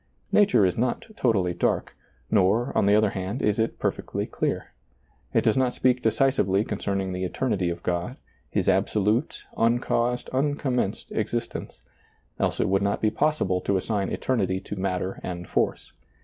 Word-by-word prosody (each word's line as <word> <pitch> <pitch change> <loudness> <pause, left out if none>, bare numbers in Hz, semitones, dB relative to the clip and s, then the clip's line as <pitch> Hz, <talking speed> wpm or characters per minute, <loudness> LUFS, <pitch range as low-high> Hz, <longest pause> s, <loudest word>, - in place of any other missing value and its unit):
Nature 200 - +5
is 90 -2 +1
not 125 0 0
totally 95 -8 +1
dark; - - -1 0.4
nor, 105 +4 +2
on - - +3
the 100 - +5
other 105 -1 +3
hand, 95 +6 -3
is 105 +1 +2
it 110 - 0
perfectly - - -2
clear. - - -2 0.6
It - - +2
does 110 - +3
not 130 -2 +1
speak 125 -1 +2
decisively 110 -4 +2
con 105 -2 -4
cerning 95 -2 -2
the 90 +1 -3
eternity 95 -1 -1
of 85 0 -5
God, 85 0 -2 0.3
His - - -1
absolute, 105 +6 +1
un 115 +1 +3
caused, 120 0 0
unconimenced 130 -5 -1
existence, - - -3 0.6
else - - 0
it - - +2
would 95 +1 +2
not 100 0 0
be 110 - +2
possible 100 -12 +1
to 100 - +1
assign 100 0 -1
eternity 95 -7 0
to - - -6
matter 95 0 -2
and 90 -1 -5
force. - - -1
105 Hz, 165 wpm, -25 LUFS, 95-120 Hz, 0.6 s, Nature